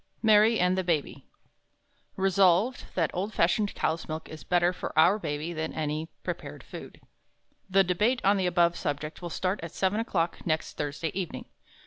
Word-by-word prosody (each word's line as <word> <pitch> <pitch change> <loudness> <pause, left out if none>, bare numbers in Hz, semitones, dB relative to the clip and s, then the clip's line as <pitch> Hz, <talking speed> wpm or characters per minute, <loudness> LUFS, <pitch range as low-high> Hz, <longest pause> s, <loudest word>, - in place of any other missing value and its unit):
_ - - -39
Mary 220 +1 +5
and 180 +1 +3
the 190 - 0
Baby 165 -5 -2 0.9
"Resolved, 195 +4 +3
that 165 -4 +1
old 200 +4 -3
fashioned 200 +5 +2
cow's 160 +1 -1
milk 155 0 -5
is 155 - -9
better 175 0 +2
for - - -5
Our 180 +7 +5
Baby, 150 -1 -3
than 160 -1 -3
any 155 +1 -2
prepared - - -6
food." - - -10 0.7
The 195 +1 +5
debate 210 +8 +1
on 200 +1 +5
the 185 -2 +1
above 175 -1 +3
subject 150 +1 -4
will 175 - -5
start 185 +4 -1
at 165 - -5
seven 195 +3 +1
o'clock 175 -7 -1
next 160 -1 -2
Thursday 150 +2 -3
evening. 185 -3 -4
175 Hz, 170 wpm, -28 LUFS, 160-195 Hz, 0.9 s, Mary